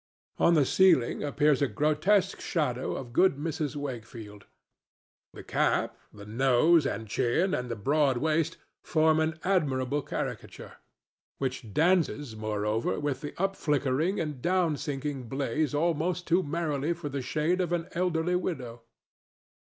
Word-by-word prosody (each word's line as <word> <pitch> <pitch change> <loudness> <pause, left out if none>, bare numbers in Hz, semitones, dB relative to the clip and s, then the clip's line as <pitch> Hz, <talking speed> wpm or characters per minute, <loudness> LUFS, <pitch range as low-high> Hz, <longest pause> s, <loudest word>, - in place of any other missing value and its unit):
On 170 - +5
the 145 -3 +4
ceiling 170 -7 +3
appears 145 0 +2
a 140 - +3
grotesque 155 - +1
shadow 130 -6 -1
of 120 -3 -7
good 185 +2 +4
Mrs. 150 -1 -3
Wakefield. 115 -7 -7 0.8
The - - -11
cap, - - 0 0.2
the 100 -1 -12
nose 135 +7 +3
and 110 -3 -4
chin 145 - +1
and 125 0 -2
the 115 - -2
broad 140 +4 +1
waist 160 +3 0 0.3
form 160 -1 +3
an 160 0 0
admirable 145 -7 0
caricature, - - -6 0.6
which 130 -5 -4
dances, 155 - +1
moreover, 110 +1 -1
with 145 -3 -2
the 145 - -8
up 195 +1 0
flickering 150 +5 0
and 150 -5 -4
down 175 -2 +1
sinking 140 -3 -4
blaze 145 +2 -1
almost 170 +3 0
too 175 +2 +3
merrily 155 -1 -1
for 170 -2 -7
the 140 -1 -3
shade 160 +7 0
of 175 -2 -2
an 175 -1 -1
elderly 175 0 0
widow. 125 -10 -4
150 Hz, 140 wpm, -28 LUFS, 130-170 Hz, 0.8 s, On